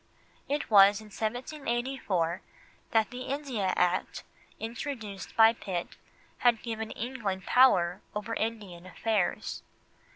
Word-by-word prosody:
It 290 -4 -2
was 200 0 +7
in 215 -1 -13
1784 240 - -2 0.5
that 220 -1 +2
the 250 0 -7
India 255 -8 -2
Act, 180 +1 0 0.4
introduced 225 -4 -6
by 225 0 +8
Pitt, 185 -6 -5 0.4
had 240 -3 +3
given 225 -2 -4
England 215 -6 -4
power 180 -9 +4
over 210 +2 -3
Indian 205 -6 -4
affairs. 210 0 -1
220 Hz, 105 wpm, -29 LUFS, 195-245 Hz, 0.5 s, by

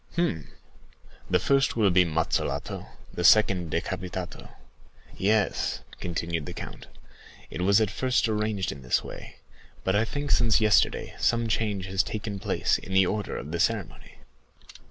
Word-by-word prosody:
"Hum! 80 - -1 0.8
'The 90 - +4
first 135 +8 +2
will 105 -4 +3
be 90 +1 +5
mazzolato, 80 0 -2 0.3
the 90 - -3
second 90 -3 +5
decapitato.' 90 +2 -4 0.7
Yes," 105 +1 +1 0.2
continued 85 -3 -3
the - - -7
count, - - -8 0.6
"it - - -4
was 100 +3 +4
at 110 -2 +1
first 130 +2 +1
arranged 105 -3 -1
in 70 - -9
this 65 -1 +1
way; - - -9 0.5
but 95 - +1
I 105 - +3
think 145 +4 -4
since 115 -3 +4
yesterday 110 -1 +2
some 115 -1 +2
change 105 -4 -1
has 95 +1 +1
taken 105 -2 -5
place 105 -1 0
in 95 - -8
the 95 0 +6
order 105 +2 -2
of 75 - -7
the 85 - -2
ceremony." - - -2
100 Hz, 150 wpm, -27 LUFS, 90-110 Hz, 0.8 s, the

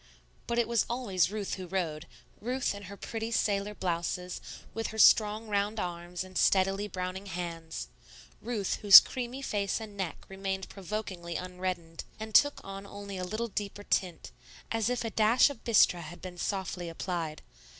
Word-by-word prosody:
But 235 - -1
it 235 - +3
was 235 -2 +2
always 205 -9 +1
Ruth 205 -1 -3
who 185 -2 -5
rowed, 165 -4 -2 0.3
Ruth 250 +2 -1
in 200 0 -8
her 200 - -9
pretty 225 +2 -4
sailor 205 -2 0
blouses, 180 0 -2 0.3
with 225 -1 -2
her 220 - -7
strong 215 +1 +5
round 205 +1 0
arms 175 -1 -4
and 185 0 -4
steadily 195 +2 +3
browning 185 +1 -5
hands; 165 -3 -5 0.5
Ruth, 220 -5 -2
whose 200 -3 +13
creamy 255 +2 -5
face 200 -5 -1
and 215 -2 -8
neck 190 -4 -4
remained 195 0 -3
provokingly 185 -3 -5
unreddened, 180 -2 -4 0.2
and 220 0 -6
took 290 +6 +5
on 195 0 -8
only 200 -1 -7
a - - -3
little 215 +6 -3
deeper 205 0 -4
tint, 180 -4 -1 0.4
as 225 0 +1
if 245 -1 -1
a 225 - -2
dash 225 +7 +5
of 255 - -11
bistre 200 -6 +5
had 170 +1 -9
been 180 -1 -8
softly 180 -3 -2
applied. 165 -2 -4
195 Hz, 165 wpm, -30 LUFS, 180-215 Hz, 0.5 s, whose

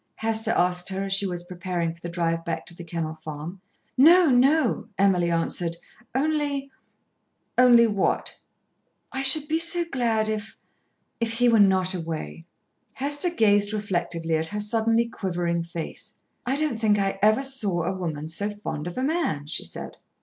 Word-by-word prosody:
Hester 225 0 -1
asked 180 -3 +1
her 190 0 -3
as 195 -1 -2
she 195 0 +1
was 175 -1 -3
preparing 175 -2 -3
for 170 - -20
the 170 - -5
drive 165 -1 -1
back 165 - -4
to 170 - -7
The 175 - -9
Kennel 165 -2 -4
Farm. 155 +4 -8 0.3
"No, 330 +4 +6
no," 270 +2 +3
Emily 185 -3 +3
answered. 170 0 -1 0.4
"Only 285 -1 -1 0.4
" - - -49
"Only 240 -2 +7
what?" 205 -4 -1 0.7
"I 265 - -3
should 285 +2 +3
be 320 +1 +1
so 340 +1 +4
glad 230 -4 +1
if 215 0 -4 0.6
if 230 -1 -1
he 245 +2 +2
were 230 -2 +5
not 190 -2 +4
away." 155 - -5 0.5
Hester 290 +5 -1
gazed 205 -9 +2
reflectively 175 -5 -2
at 160 +1 -2
her 210 +5 -4
suddenly 225 +2 +1
quivering 175 -5 -2
face. 170 -1 -7 0.3
"I 265 - +1
don't 295 -6 -1
think 215 -2 +3
I 195 -1 -1
ever 215 +5 +4
saw 210 -11 -1
a 180 +4 -1
woman 160 -5 -4
so 200 +6 -2
fond 205 -7 -5
of 175 - -7
a 255 - -1
man," 275 - -1
she 150 - -3
said. - - -7
200 Hz, 170 wpm, -25 LUFS, 170-245 Hz, 0.7 s, Only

